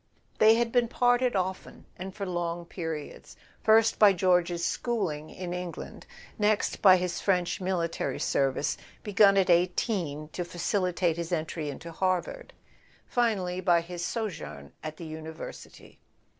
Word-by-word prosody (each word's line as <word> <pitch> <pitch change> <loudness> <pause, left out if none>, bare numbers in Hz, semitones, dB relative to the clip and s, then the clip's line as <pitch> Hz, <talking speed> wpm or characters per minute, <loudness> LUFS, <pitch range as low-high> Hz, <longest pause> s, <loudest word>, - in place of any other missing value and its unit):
They 220 +1 +7
had 235 0 0
been 245 -1 +3
parted 245 0 +2
often, 185 0 -3
and 190 +2 -6
for 200 -2 -4
long 175 -1 -3
periods; 160 -4 -7 0.3
first 220 +1 +4
by 205 -2 +7
George's 175 -2 +2
schooling 180 -11 -2
in 180 -1 -6
England, 180 -1 -7 0.3
next 210 0 +1
by 185 -2 +8
his 180 -1 -3
French 180 -2 0
military 170 -7 -1
service, 135 +1 0 0.3
begun 200 -1 +5
at 190 -2 +4
eighteen 170 -3 0
to 175 - -4
facilitate 175 -1 0
his 170 0 -4
entry 155 -2 -2
into 165 +4 -8
Harvard; 185 - -2 0.5
finally, 195 -7 0
by 175 -2 +4
his 175 0 -6
sojourn 175 - -5
at 155 0 -6
the 170 - -8
University. 160 0 -9
180 Hz, 135 wpm, -28 LUFS, 170-200 Hz, 0.5 s, by